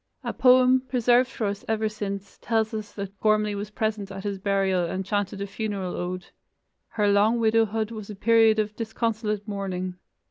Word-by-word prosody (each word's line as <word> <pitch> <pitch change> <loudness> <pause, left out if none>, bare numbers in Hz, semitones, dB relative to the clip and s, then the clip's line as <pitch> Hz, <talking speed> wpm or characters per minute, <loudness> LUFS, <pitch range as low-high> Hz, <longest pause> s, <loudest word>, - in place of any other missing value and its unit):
A - - -3
poem, 255 0 +5
preserved 250 0 +3
for 230 - -3
us 200 0 -3
ever 220 0 0
since, 200 -2 -6
tells 220 0 0
us 215 -1 -5
that 200 -1 -6
Gormlai 215 -1 +2
was 205 +1 -4
present 215 -2 -2
at 195 0 -7
his 200 -2 -3
burial 195 -2 +1
and 185 +3 -3
chanted 200 0 -2
a - - -1
funeral 195 -2 -4
ode. 180 0 -4 0.6
Her 210 -2 0
long 205 +3 +4
widowhood 225 -1 +2
was 215 -2 -7
a 210 - -6
period 225 +1 +4
of 215 -1 -1
disconsolate 220 -2 -2
mourning. 185 -3 -4
210 Hz, 175 wpm, -25 LUFS, 200-220 Hz, 0.6 s, poem